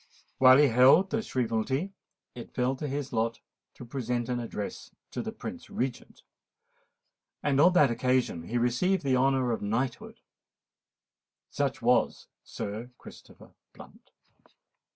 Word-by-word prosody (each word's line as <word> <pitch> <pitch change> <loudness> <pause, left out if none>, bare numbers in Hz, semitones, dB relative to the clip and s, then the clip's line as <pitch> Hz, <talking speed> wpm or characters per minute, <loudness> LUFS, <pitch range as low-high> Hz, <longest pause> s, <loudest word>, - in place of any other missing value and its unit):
While 130 0 +8
he 145 -1 +5
held 135 - +5
the 225 - 0
Shrievalty, 130 - -2 0.4
it 120 - -11
fell 125 +1 0
to 150 - -4
his 140 0 -4
lot 115 0 -1 0.4
to - - -10
present 120 -1 -3
an 125 -1 -1
address 110 -3 -6 0.2
to - - -4
the - - -5
Prince - - -8
Regent; 125 0 -5 1.2
and 140 -1 +2
on 180 +3 +6
that 150 -8 +5
occasion 125 -9 0
he 120 +7 -2
received 125 +11 +1
the 135 -2 +2
honour 130 -1 +2
of 115 - -2
knighthood. 115 +5 -3 1.3
Such - - -2
was - - +2 0.2
Sir 110 +4 -6
Christopher - - -15 0.2
Blunt. - - -16
125 Hz, 130 wpm, -28 LUFS, 120-140 Hz, 1.3 s, While